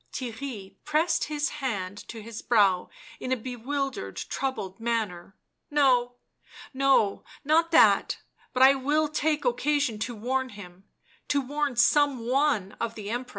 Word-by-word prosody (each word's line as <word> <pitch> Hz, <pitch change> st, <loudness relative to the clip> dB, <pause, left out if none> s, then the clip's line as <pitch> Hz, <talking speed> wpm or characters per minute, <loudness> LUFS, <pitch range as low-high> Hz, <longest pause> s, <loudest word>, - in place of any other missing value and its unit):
Theirry 225 Hz, -6 st, -6 dB
pressed 305 Hz, +3 st, +1 dB
his 295 Hz, -1 st, -1 dB
hand 205 Hz, -6 st, -4 dB
to 225 Hz, -2 st, -8 dB
his 225 Hz, 0 st, -8 dB
brow 200 Hz, -6 st, +3 dB, 0.3 s
in 255 Hz, -, -5 dB
a 260 Hz, -, +2 dB
bewildered, 255 Hz, -, -4 dB
troubled 230 Hz, -8 st, -4 dB
manner. 215 Hz, -6 st, -3 dB, 0.2 s
" -, -, -53 dB
No, 245 Hz, -3 st, +3 dB, 0.6 s
no, 265 Hz, -7 st, +2 dB, 0.2 s
not 320 Hz, +3 st, +3 dB
that; -, -, +5 dB, 0.3 s
but 255 Hz, -, +3 dB
I 270 Hz, +1 st, +8 dB
will 295 Hz, +3 st, +1 dB
take 305 Hz, 0 st, 0 dB
occasion 290 Hz, -, +1 dB
to 240 Hz, +2 st, -3 dB
warn 260 Hz, +4 st, -1 dB
him 190 Hz, -4 st, -12 dB, 0.2 s
— -, -, -33 dB
to 285 Hz, -, +2 dB
warn 285 Hz, 0 st, -2 dB
some 275 Hz, +2 st, +3 dB
one 255 Hz, -6 st, +1 dB
of 230 Hz, 0 st, -3 dB
the 210 Hz, -1 st, -6 dB
'Empress." 245 Hz, +1 st, -3 dB
250 Hz, 150 wpm, -27 LUFS, 215-280 Hz, 0.6 s, I